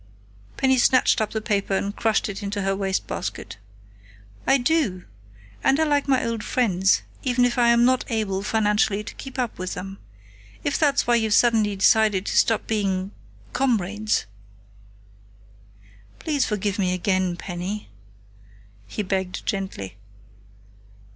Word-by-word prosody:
Penny 265 -1 +3
snatched 250 -1 +4
up 215 - 0
the 220 - -3
paper 200 -3 0
and 200 +2 -3
crushed 220 -2 +1
it 205 0 -6
into 200 0 -3
her 195 0 0
wastebasket. 195 - -3 0.9
"I 270 - +5
do! 245 - 0 0.6
And 270 +2 +3
I - - +4
like 290 -2 +1
my 265 -2 +2
old 230 -2 -3
friends, 190 -6 +2 0.2
even 245 -1 +2
if 245 0 0
I 240 - +4
am 235 0 +5
not 255 0 +2
able, 210 -4 -1
financially, 210 -1 +1
to - - -8
keep 270 0 -9
up 245 -7 -2
with 185 0 -4
them.... 195 +1 -7 0.6
If 285 - 0
that's 285 -3 +2
why 240 0 +3
you've 220 -2 +2
suddenly 220 -4 +3
decided 205 0 +3
to - - -2
stop 225 -2 +3
being 195 -3 -1 0.4
comrades 215 -4 0 1.3
" 100 0 -27
"Please 295 -4 0
forgive 205 -1 -2
me 185 -2 +1
again, 185 -1 0
Penny," 180 - -5 1.0
he 210 - -4
begged 190 -1 -3
gently. 145 - -4
210 Hz, 140 wpm, -23 LUFS, 190-240 Hz, 1.3 s, I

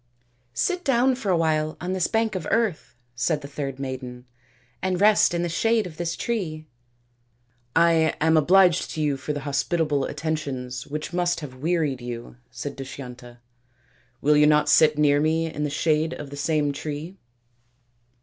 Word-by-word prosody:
" 120 0 -42
Sit 360 -1 -1
down 260 -2 +3
for 245 -5 -4
a 180 - +3
while 155 -1 0
on 180 +1 -3
this 185 -2 +1
bank 225 -1 0
of 185 -5 -4
earth," 220 - 0 0.2
said 135 +6 0
the 140 - -8
third 140 -2 -5
maiden, 130 -2 -6 0.3
" 120 +1 -36
and 185 -1 -1
rest 210 +1 +5
in 170 0 -1
the - - 0
shade 225 +5 +1
of 165 -4 -9
this 170 -1 -2
tree." 165 -10 -3 0.6
" 120 0 -42
I 165 -1 +4
am 160 +1 +3
obliged 180 +2 +4
to 155 - -2
you 145 -2 +1
for 135 - -5
the 145 -1 -3
hospitable 145 +1 0
attentions 140 -5 -4
which 150 +3 -5
must 175 -1 0
have 145 -4 -7
wearied 155 -5 0
you," 120 0 -7
said 145 - -6
Dushyanta. 125 -3 -9 0.4
" 125 -1 -37
Will 150 +1 +4
you 150 0 +5
not 150 0 +3
sit 150 0 +5
near 145 -1 +4
me 160 +1 +1
in 150 - -3
the - - -1
shade 155 +2 0
of 145 -2 -8
the - - -6
same 150 0 0
tree 155 +6 -6
155 Hz, 180 wpm, -24 LUFS, 135-170 Hz, 0.6 s, rest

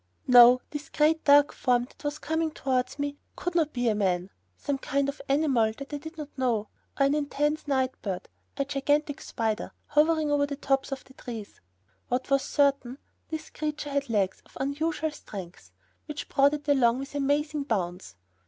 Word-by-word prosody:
No, 250 0 +8
this 295 0 -6
great, 315 +1 +2
dark 285 0 +6
form 245 -1 +2
that 255 - -20
was 290 0 -2
coming 320 +1 -1
towards 260 -4 -1
me 285 0 -3 0.2
could 355 - -3
not 320 -3 +2
be 245 -1 -1
a 220 - +4
man 190 -3 0 0.3
some 280 -1 -2
kind 280 0 0
of 280 +1 -4
animal 270 -7 +3
that 275 +1 -8
I 290 - -2
did 320 +2 -10
not 300 -2 -8
know, 235 -5 0 0.3
or 275 - +5
an 275 - +3
immense 295 +1 -1
night 260 -2 +1
bird, 190 -3 -4 0.3
a 275 - 0
gigantic 290 +1 0
spider, 220 -2 -2
hovering 305 0 +2
over 285 0 +2
the 285 - -4
tops 270 -1 0
of 270 -1 -4
the 265 - -18
trees. 225 -5 -8 0.5
What 255 +3 -2
was 275 0 +4
certain, 275 -3 +1 0.3
this 315 -1 -6
creature 300 -1 -4
had 280 -2 -1
legs 195 -4 0
of - - -16
unusual 310 +3 -1 0.2
length, 175 - -8 0.4
which 300 -1 -6
brought 280 +2 +4
it 295 0 -9
along 250 -4 +4
with 275 +1 -6
amazing 290 +1 0
bounds. 180 - -3
280 Hz, 180 wpm, -27 LUFS, 245-295 Hz, 0.5 s, No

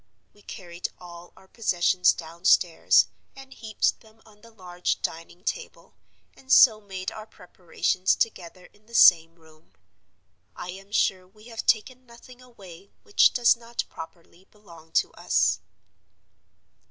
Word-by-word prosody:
We 205 - -23
carried 175 -4 -8
all 175 -1 -13
our 190 - -20
possessions 180 -4 +1
downstairs, 170 +1 +2 0.3
and 270 -1 -13
heaped 220 -4 -2
them 220 0 -22
on 210 -1 -21
the 230 - -17
large 180 -5 -4
dining 165 +2 -6
table, 485 - -6 0.4
and 265 0 -12
so 220 -4 +6
made 190 -2 -6
our 215 0 -10
preparations 180 -1 -2
together 180 -4 -4
in 210 +1 -28
the 235 - -11
same 165 -4 +6
room. 160 - -23 0.8
I 180 - -8
am 195 +2 -13
sure 185 -3 0
we 215 +5 -18
have 225 -1 -7
taken 255 +3 0
nothing 245 +1 -16
away 195 -7 -15
which 420 -2 +4
does 240 -1 +4
not 235 0 -5
properly 170 +2 -13
belong 170 -6 -18
to - - +1
us. - - 0
190 Hz, 140 wpm, -25 LUFS, 175-225 Hz, 0.8 s, so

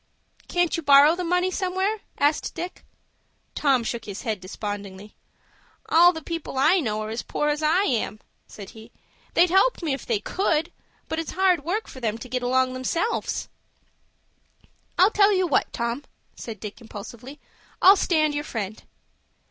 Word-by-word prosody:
"Can't 350 -1 +1
you 330 - -3
borrow 285 +2 +6
the 360 - -4
money 360 +2 +1
somewhere?" 380 +3 -1 0.2
asked 290 +2 +1
Dick. 350 +2 -6 0.7
Tom 270 -5 +2
shook 230 0 -4
his 200 -1 -7
head 220 -5 -2
despondingly. 200 +1 -7 0.8
"All 345 +2 +7
the 320 -3 -8
people 330 -4 -5
I 315 +8 +4
know 215 -7 -2
are 215 - -5
as 225 - -3
poor 295 - -2
as 295 +1 -1
I 320 +5 +3
am," 230 - -1 0.3
said 200 -2 -11
he. 225 0 -14 0.4
"They'd 345 0 +4
help 385 +2 +3
me 305 -4 0
if 270 - -6
they 225 -4 +1
could, 330 - -1 0.4
but 320 - -3
it's 325 - -5
hard 365 -5 +2
work 390 +8 -2
for 260 - -10
them 225 -3 -2
to 230 - -9
get 250 0 -2
along 255 +1 +1
themselves." 335 - -2 1.5
"I'll 375 +4 +5
tell 410 -1 +4
you 370 -1 +2
what, 320 - +1
Tom," 235 +4 -3 0.3
said 220 -3 -8
Dick, 210 +3 -8
impulsively, 235 +5 -10 0.4
"I'll 385 +2 +8
stand 310 -5 +1
your 290 0 -2
friend." 220 -6 -5
290 Hz, 165 wpm, -24 LUFS, 230-355 Hz, 1.5 s, I'll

